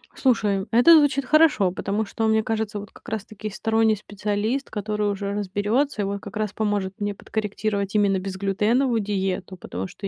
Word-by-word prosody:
Слушай, 210 Hz, -7 st, +1 dB
это 245 Hz, +9 st, +7 dB
звучит 285 Hz, -2 st, +3 dB
хорошо, 300 Hz, -, +4 dB
потому 200 Hz, +3 st, -2 dB
что, 225 Hz, +2 st, -2 dB
мне 220 Hz, 0 st, +3 dB
кажется, 220 Hz, -1 st, -2 dB
вот 205 Hz, 0 st, -10 dB
как -, -, -18 dB
раз 220 Hz, -2 st, -3 dB
таки 215 Hz, 0 st, -7 dB
сторонний 220 Hz, +1 st, +2 dB
специалист, 210 Hz, +5 st, -2 dB
который 210 Hz, 0 st, -2 dB
уже 200 Hz, 0 st, -3 dB
разберётся 210 Hz, +6 st, 0 dB
и -, -, 0 dB
вот 200 Hz, +1 st, -3 dB
как -, -, -10 dB
раз 215 Hz, -2 st, -1 dB
поможет 205 Hz, -3 st, -1 dB
мне 205 Hz, 0 st, -1 dB
подкорректировать 205 Hz, -1 st, -3 dB
именно 200 Hz, -2 st, +3 dB
безглютеновую 210 Hz, +6 st, 0 dB
диету, 190 Hz, -2 st, -2 dB
потому 95 Hz, -, -6 dB
что 195 Hz, -, -7 dB
210 Hz, 175 wpm, -24 LUFS, 200-220 Hz, -, это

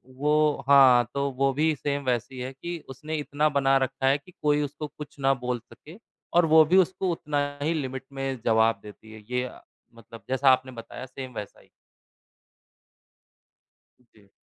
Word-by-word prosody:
वो 150 Hz, 0 st, +1 dB
हाँ, 130 Hz, -4 st, +7 dB
तो 140 Hz, 0 st, -1 dB
वो 135 Hz, +1 st, +1 dB
भी 155 Hz, +3 st, +2 dB
सेम 140 Hz, +1 st, -3 dB
वैसी 125 Hz, +1 st, -2 dB
है 130 Hz, +1 st, -4 dB
कि 170 Hz, +5 st, -6 dB
उसने 150 Hz, +4 st, -6 dB
इतना 150 Hz, +1 st, 0 dB
बना 135 Hz, 0 st, +3 dB
रखा 135 Hz, 0 st, -1 dB
है 135 Hz, +2 st, +4 dB
कि 180 Hz, +5 st, -19 dB
कोई 150 Hz, 0 st, +2 dB
उसको 145 Hz, +2 st, -5 dB
कुछ 150 Hz, -1 st, -12 dB
ना 135 Hz, 0 st, +3 dB
बोल 125 Hz, -1 st, -3 dB
सके 160 Hz, +6 st, -14 dB, 0.4 s
और 175 Hz, 0 st, +5 dB
वो 160 Hz, 0 st, +7 dB
भी 180 Hz, +5 st, +3 dB
उसको 185 Hz, 0 st, +2 dB
उतना 150 Hz, -3 st, -2 dB, 0.2 s
ही 160 Hz, +3 st, 0 dB
लिमिट 135 Hz, -4 st, -4 dB
में 135 Hz, -2 st, -3 dB
जवाब 110 Hz, -1 st, +3 dB
देती 105 Hz, +1 st, -13 dB
है। 110 Hz, -1 st, -12 dB
ये 125 Hz, 0 st, -1 dB, 0.5 s
मतलब 115 Hz, 0 st, -14 dB
जैसा 135 Hz, +1 st, +3 dB
आपने 130 Hz, 0 st, +1 dB
बताया 125 Hz, +1 st, -9 dB
सेम 130 Hz, -1 st, -9 dB
वैसा 105 Hz, -, -8 dB
ही। -, -, -25 dB, 2.3 s
उ, -, -, -28 dB
जी। 100 Hz, -2 st, -23 dB
135 Hz, 175 wpm, -26 LUFS, 125-150 Hz, 2.3 s, हाँ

